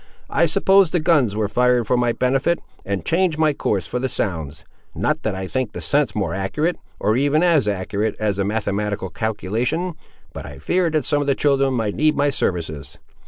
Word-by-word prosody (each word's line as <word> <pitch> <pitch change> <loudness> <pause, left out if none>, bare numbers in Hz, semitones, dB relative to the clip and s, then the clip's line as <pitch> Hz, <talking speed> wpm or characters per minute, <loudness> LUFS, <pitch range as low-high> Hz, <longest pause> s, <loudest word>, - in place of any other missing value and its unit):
I 170 +3 +3
supposed 195 +1 +4
the 175 - +3
guns 150 - +2
were 105 -1 0
fired 125 +2 +2
for 125 - +1
my 120 -1 +2
benefit, 135 +8 +1 0.3
and 95 -3 -3
changed 170 -2 +1
my 155 -1 +3
course 100 - -1
for 85 +9 -3
the 130 +1 -1
sounds—not 80 - -4
that 110 -3 -2
I 95 0 -4
think 125 +2 -2
the - - -5
sense 145 -1 +1
more 95 -6 -1
accurate, 150 - -1 0.2
or 105 +1 +1
even 145 +4 +2
as 160 -10 +3
accurate 100 +2 -1
as 105 -2 -1
a - - +2
mathematical 105 0 -2
calculation, 110 - -2 0.4
but - - -7
I 70 -2 -9
feared 175 - 0
that 155 -3 +1
some 145 -1 +1
of 145 - -3
the 140 - +3
children 135 -2 +2
might 110 -4 -1
need 155 0 +2
my 145 0 +2
services." 80 - -3
125 Hz, 195 wpm, -21 LUFS, 100-150 Hz, 0.4 s, supposed